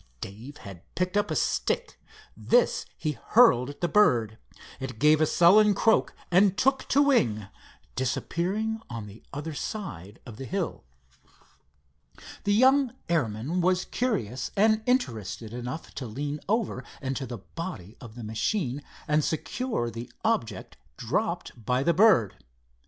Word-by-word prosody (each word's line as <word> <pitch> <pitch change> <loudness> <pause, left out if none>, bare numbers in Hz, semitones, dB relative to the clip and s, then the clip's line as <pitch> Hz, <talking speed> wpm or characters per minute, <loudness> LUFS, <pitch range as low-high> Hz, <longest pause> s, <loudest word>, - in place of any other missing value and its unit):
Dave 115 - -9
had 95 -4 -11
picked 180 +2 -1
up 205 0 +1
a - - -1
stick. - - -1 0.3
This - - +2
he 150 -3 -3
hurled 140 - +5
at 145 - -10
the 175 - +2
bird. 120 - +3 0.4
It 130 -3 -6
gave 150 +4 +4
a 155 - +4
sullen 200 +6 +5
croak 220 +2 +2 0.2
and 190 +2 +4
took 270 0 +2
to 285 - +4
wing, 115 - +2 0.5
disappearing 190 - -1
on 115 -3 -6
the 105 +2 -12
other 150 +3 -5
side 115 - -6
of 115 -4 -10
the 135 - -6
hill. 190 +3 -3 1.6
The 205 - +3
young 265 +2 +4
airman 145 +2 0
was 180 +1 +2
curious 135 - -2
and 215 +2 +4
interested 115 - -1
enough 125 +6 -6
to 130 - -5
lean 145 +6 -4
over 215 - 0 0.2
into 135 0 -3
the 120 - -6 0.2
body 165 - -6
of 115 -2 -11
the 120 - -8
machine 125 - -1 0.3
and 150 0 +2
secure 160 - -2
the 115 +1 -8
object 115 - -1 0.2
dropped 115 - -2
by 125 +4 +1
the 170 - +3
bird. 180 - +4
150 Hz, 140 wpm, -27 LUFS, -, 1.6 s, hurled